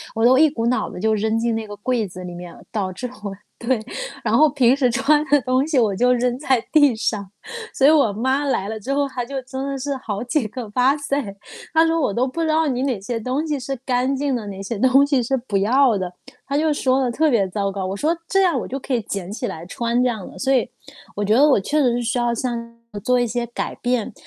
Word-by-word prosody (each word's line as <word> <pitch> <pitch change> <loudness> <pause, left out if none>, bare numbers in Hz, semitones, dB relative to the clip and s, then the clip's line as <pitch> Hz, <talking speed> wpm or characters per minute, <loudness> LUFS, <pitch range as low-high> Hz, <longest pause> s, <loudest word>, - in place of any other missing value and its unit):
我 225 - 0
都 255 +2 +6
一 310 +2 +6
股 230 -5 -3
脑 250 - 0
子 - - -8
就 220 +2 +1
扔 220 +2 0
进 230 0 0
那 225 -1 -3
个 205 - -8
柜 225 0 -1
子 185 0 -9
里 180 - -7
面。 175 -1 -9 0.2
导 195 -4 -2
致 250 +7 -5 0.2
我 200 -2 -4 0.3
对， 240 -1 0 0.4
然 - - +1
后 310 - +6
平 260 -3 +3
时 265 - +3
穿 290 +5 +3
的 290 -1 +4
东 255 +2 +1
西 300 -5 +2
我 210 -4 +2
就 250 +4 +3
扔 245 0 0
在 260 -4 +1
地 290 -6 +5
上。 205 -3 -2 0.4
所 270 - +4
以 - - +8
我 285 -9 +4
妈 260 +7 0
来 200 -8 0
了 220 0 -4
之 270 +7 -3
后， 285 0 +1
她 255 -2 -4
就 270 +1 -4
真 265 +1 -5
的 275 -1 -3
是 280 +1 -2
好 210 -5 -4
几 250 -1 0
个 230 0 -7
“哇塞”， 275 -1 0 0.4
她 320 0 +5
说 330 0 +1
我 210 - 0
都 250 +5 +1
不 260 - -6
知 325 - +1
道 315 0 +2
你 255 -2 -1
哪 260 -6 -1
些 230 +3 -3
东 255 +7 -2
西 295 -2 -1
是 270 +1 -4
干 255 +1 +1
净 275 -1 -1
的， 230 -3 -4
哪 195 -1 -7
些 200 +2 -4
东 260 +4 +5
西 280 -3 +2
是 270 +4 0
不 235 -5 -2
要 235 +3 +3
的， 185 -2 -3 0.3
她 280 - -3
就 310 +1 +2
说 265 -2 +1
的 255 - +1
特 315 +6 +2
别 200 -5 +2
糟 200 +1 -2
糕。 195 -1 -4
我 190 - -3
说： 310 +10 0
“这 390 - +2
样 340 -8 +2
我 - - -5
就 270 - -4
可 270 - -4
以 240 - +1
捡 195 -2 -5
起 240 +3 -3
来 160 +1 -7
穿”， 235 +6 -1
这 - - +3
样 215 -6 -5
的。 - - -13
所 270 0 +1
以， 250 -4 +2 0.5
我 205 - -2
觉 210 - +2
得 285 +5 +6
我 275 - +4
确 295 +10 0
实 250 -4 +3
是 245 - -1
需 235 +2 -1
要 240 0 +1
像 235 -1 -4 0.3
做 250 0 +3
一 245 - +2
些 240 +1 -2
改 240 - -4
变。 245 -2 -1
250 Hz, 285 characters per minute, -21 LUFS, 220-275 Hz, 0.5 s, 以